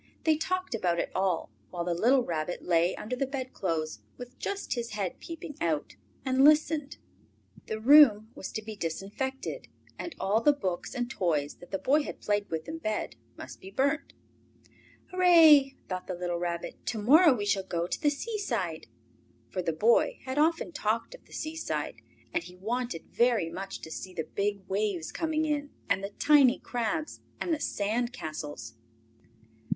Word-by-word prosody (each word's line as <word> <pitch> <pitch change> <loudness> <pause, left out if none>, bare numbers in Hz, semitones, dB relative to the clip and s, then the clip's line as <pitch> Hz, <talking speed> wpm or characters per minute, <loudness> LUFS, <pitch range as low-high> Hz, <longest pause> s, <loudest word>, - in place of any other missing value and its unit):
They 315 -1 +4
talked 370 +2 -2
about 180 -6 +1
it - - -1
all, 185 - 0 0.2
while 175 -1 -3
the 175 0 0
little 245 +9 +4
Rabbit 165 -3 -3
lay 170 +1 +2
under 235 +4 -4
the 270 +2 -1
bedclothes, 190 - -3 0.2
with 245 0 -10
just 400 0 -3
his 235 -2 -4
head 200 -4 -3
peeping 325 -3 -8
out, 155 -3 -1 0.3
and 260 0 +3
listened. 300 -1 +4 0.7
The 220 - -3
room 230 -4 +7
was - - -7
to 220 - -4
be 220 0 -7
disinfected, 205 - -4 0.3
and 340 - -5
all 210 +4 +2
the 295 +5 +5
books 185 -10 -3
and 245 -1 -1
toys 160 - -1
that 175 - -14
the 195 - -1
Boy 280 +9 +3
had - - -6
played 205 0 0
with 160 -1 -4
in 325 +1 -5
bed 215 - -2 0.2
must 130 - -9
be 190 - -9
burnt. 280 +9 0 1.0
"Hurrah!" 330 -6 +7 0.2
thought 185 -1 -4
the 185 - -3
little 175 -1 -2
Rabbit. 170 -1 -4
"To 225 - -1
morrow 285 - +6
we 205 -3 -3
shall 205 -1 +2
go 170 -3 -2
to - - -3
the 295 - +4
seaside!" 280 - -3 0.6
For 185 - -2
the 170 - 0
boy 215 +9 +3
had 260 +2 -2
often 330 +3 +2
talked 230 - -1
of - - -14
the - - -23
seaside, 320 +1 -4 0.3
and - - 0
he 180 +1 -12
wanted 230 -1 -3
very 235 -9 +2
much 195 +3 -6
to 160 - -9
see 185 +2 -7
the 160 - -1
big 200 -1 -1
waves 195 -4 -1
coming 315 -1 0
in, 290 -1 -1 0.2
and 195 - +1
the 200 - -3
tiny 285 -4 +6
crabs, 245 +6 -3 0.2
and 340 - 0
the 310 - -1
sand 235 -1 -1
castles. 150 - -6
220 Hz, 175 wpm, -29 LUFS, 180-290 Hz, 1.0 s, room